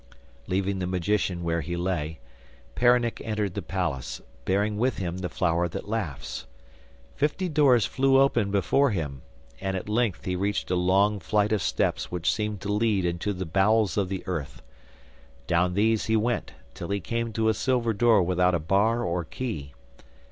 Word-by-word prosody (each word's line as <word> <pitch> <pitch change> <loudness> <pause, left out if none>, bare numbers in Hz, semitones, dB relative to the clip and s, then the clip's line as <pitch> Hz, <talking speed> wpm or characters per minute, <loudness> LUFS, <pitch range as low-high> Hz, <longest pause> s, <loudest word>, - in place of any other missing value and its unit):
Leaving 95 +1 0
the 90 - -2
magician 90 0 0
where 85 0 0
he 85 +1 -4
lay, 85 -3 -2 0.6
Peronnik 120 -1 +2
entered 105 -4 -2
the - - -3
palace, 85 -9 -3 0.3
bearing 105 +2 +1
with 125 +2 +1
him 90 -1 -3
the 90 -1 -3
flower 85 -1 +1
that 85 - -6
laughs. 75 -11 -4 0.7
Fifty 155 +6 0
doors 140 -8 +4
flew 135 0 +3
open 120 -7 +3
before 105 +8 +2
him, 75 - -3 0.4
and 95 0 -2
at 95 - -6
length 110 -3 0
he 90 - -1
reached 100 0 -1
a - - +3
long 100 +4 +3
flight 105 +2 +1
of 110 - +1
steps - - -1
which 90 -1 +1
seemed 105 -2 -2
to 105 - -2
lead 105 -3 +1
into 85 +4 -1
the 95 -1 -4
bowels 100 +5 +2
of 100 -3 0
the 95 -1 -4
earth. 80 -8 -5 0.8
Down 90 +1 +1
these 110 +2 +2
he 110 0 +3
went 115 +2 -1 0.2
till - - -7
he 100 0 0
came 115 +4 -2
to 110 +1 +1
a 110 - +4
silver 120 -2 0
door 110 -2 +4
without 90 0 +2
a - - 0
bar 100 +9 +2
or 85 -3 -1
key. 80 - -5
100 Hz, 175 wpm, -26 LUFS, 90-110 Hz, 0.8 s, doors